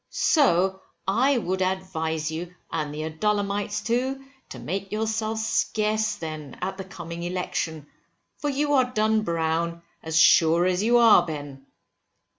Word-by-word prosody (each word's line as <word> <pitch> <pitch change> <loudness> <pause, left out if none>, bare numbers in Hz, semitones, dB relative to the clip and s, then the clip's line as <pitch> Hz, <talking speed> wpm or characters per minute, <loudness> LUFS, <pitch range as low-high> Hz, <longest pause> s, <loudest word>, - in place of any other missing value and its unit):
So 190 - +2 0.3
I 250 +8 +3
would 190 -4 -2
advise 160 -4 -2
you, 170 +2 -6 0.2
and 155 -3 -2
the 150 +1 -5
Adullamites 205 +4 -1
too, 260 +3 -1 0.2
to - - -8
make 195 +3 -4
yourselves 220 +1 -1
scarce 215 -1 0
then, 155 -5 -7
at 190 +1 -3
the 190 - -5
coming 170 -3 -8
election, 170 -3 -3 0.5
for 295 - -1
you 290 +1 0
are 260 -2 +5
done 220 -1 +2
brown 170 -1 -1 0.2
as 160 0 -2
sure 165 +1 +5
as 185 0 +1
you 235 +3 +4
are 230 -6 +7
born, 160 -3 -4 0.2
Ben. 135 0 -21
190 Hz, 145 wpm, -25 LUFS, 165-220 Hz, 0.5 s, are